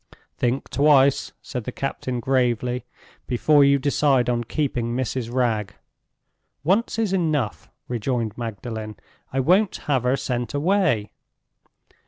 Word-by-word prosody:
"Think 125 +2 -1
twice," 140 -1 +4
said 125 -4 -5
the - - -3
captain, 130 -2 -3
gravely, 125 -1 0 0.4
"before 145 +4 +4
you 140 0 +5
decide 135 -3 +2
on 120 -1 0
keeping 120 -3 -2
Mrs. 125 -2 -2
Wragge." 110 -5 0 0.9
"Once 195 +11 +1
is 220 -4 0
enough," 155 - -1 0.2
rejoined 120 -2 -2
Magdalen. 110 -1 -5 0.4
"I 135 - -1
won't 185 +9 +3
have 135 -4 +2
her 125 +2 +1
sent 125 0 -3
away." 155 - +1
130 Hz, 120 wpm, -23 LUFS, 120-145 Hz, 0.9 s, you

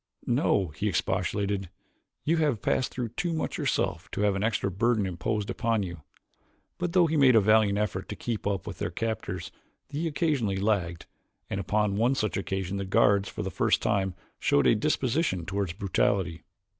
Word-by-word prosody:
"No," 95 -3 +2
he 75 +8 -3
expostulated, 100 +1 -1 0.5
"you 165 +3 +2
have 150 -9 +1
passed 130 - +1
through 125 -2 -3
too 170 +9 -2
much 160 - -2
yourself - - -1
to - - -2
have 105 -1 +2
any 95 - -1
extra 110 -3 0
burden 110 +2 +1
imposed 100 +4 -2
upon 115 -2 0
you." 85 -4 -6 0.8
But 175 -1 -2
though 180 -2 +5
he 160 -1 0
made 130 -4 +6
a - - +8
valiant 105 -1 +4
effort 95 -3 -2
to 105 - -4
keep 115 -3 -3
up 100 -2 -1
with - - -7
their - - -1
captors 100 -4 -3 0.4
he 150 +3 -2
occasionally 140 - 0
lagged, 95 -5 0 0.5
and 100 - -1
upon 100 +1 0
one 120 +5 +3
such 110 -5 -1
occasion 95 0 -2
the 100 - -2
guards 100 +1 +3
for - - -5
the - - -3
first - - +2
time 95 -3 +1 0.2
showed 70 - +3
any - - +6
disposition 130 - 0
toward 95 -2 -2
brutality. 95 -3 0
105 Hz, 180 wpm, -28 LUFS, 95-120 Hz, 0.8 s, a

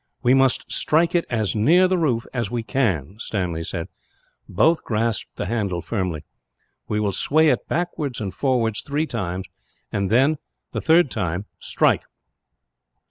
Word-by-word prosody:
"We 125 - +5
must 135 -1 +3
strike 165 +3 +2
it 175 -1 +2
as 110 -4 0
near 165 - +5
the 185 - +1
roof 125 -8 +1
as 120 -5 -1
we 120 -1 -2
can," 100 - -1
Stanley 90 -8 -2
said. 85 +1 -4 0.6
Both 160 - +3
grasped 115 0 -2
the - - -3
handle 100 -5 -2
firmly. 90 -8 -2 0.6
"We 105 - -1
will 105 -1 +1
sway 155 - +3
it 125 - 0
backwards 155 -6 -2
and 100 -4 -4
forwards 115 +1 0
three 145 +2 -1
times 95 - -3 0.5
and, 100 -2 -1
the 135 +7 0
third 160 -3 +4
time, 90 -2 -2
strike. - - +2
115 Hz, 145 wpm, -23 LUFS, 100-145 Hz, 0.6 s, We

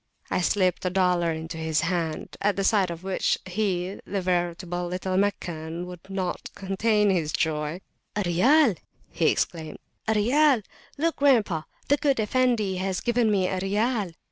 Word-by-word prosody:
I - - +1
slipped 185 -1 +1
a 180 - +1
dollar 180 -2 +2
into 160 +1 -5
his 160 -1 0
hand; 165 -3 -2
at 205 0 +2
the 195 - -1
sight 195 -2 +3
of 170 +1 -7
which 190 -1 0
he, 185 -1 -2
veritable 175 -2 -1
little 185 +1 -2
Meccan, 175 -4 -2
could 180 +1 -11
not 190 -2 -3
contain 205 +2 +1
his 165 -5 0
joy. 155 +2 -1 0.3
The 205 - 0
Riyal! 225 - +4 0.3
he - - +1
exclaimed; 160 -2 -2 0.3
the 220 - +3
Riyal! 255 +3 +4 0.3
look, 330 +3 0
grandpa, 225 - +3 0.3
the 285 - +4
good 280 -4 +1
Effendi 220 -4 +1
has 190 0 -1
given 240 -1 +1
me 195 -3 +2
a 185 - -1
Riyal! 205 -1 0
190 Hz, 155 wpm, -26 LUFS, 175-210 Hz, 0.3 s, Riyal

